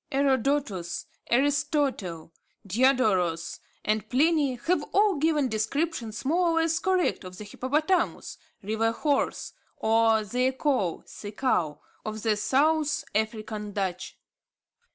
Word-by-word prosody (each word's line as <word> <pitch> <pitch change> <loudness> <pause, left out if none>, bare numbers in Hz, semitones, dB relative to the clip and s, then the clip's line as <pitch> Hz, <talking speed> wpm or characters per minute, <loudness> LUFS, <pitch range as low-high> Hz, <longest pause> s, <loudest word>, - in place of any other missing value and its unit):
Herodotus, 270 - 0 0.2
Aristotle, 265 - 0 0.3
Diodorus, 200 -7 +2 0.3
and 215 0 0
Pliny 290 0 +2
have 320 +7 0
all 405 -3 +4
given 300 -2 +2
descriptions 235 +1 -2
more 345 +5 +2
or - - +1
less 330 0 +2
correct 370 - +1
of 185 0 -9
the 210 - -7
hippopotamus, 300 - -1 0.2
river 220 +2 0
horse, 285 +3 -1 0.2
or 225 0 +3
zeekoe 250 - 0
(sea 205 0 -9
cow) 170 - 0 0.2
of 215 0 -5
the 220 -2 +2
South 290 +8 +2
African 215 -1 -2
Dutch. 190 -2 -3
245 Hz, 110 wpm, -27 LUFS, 210-295 Hz, 0.3 s, all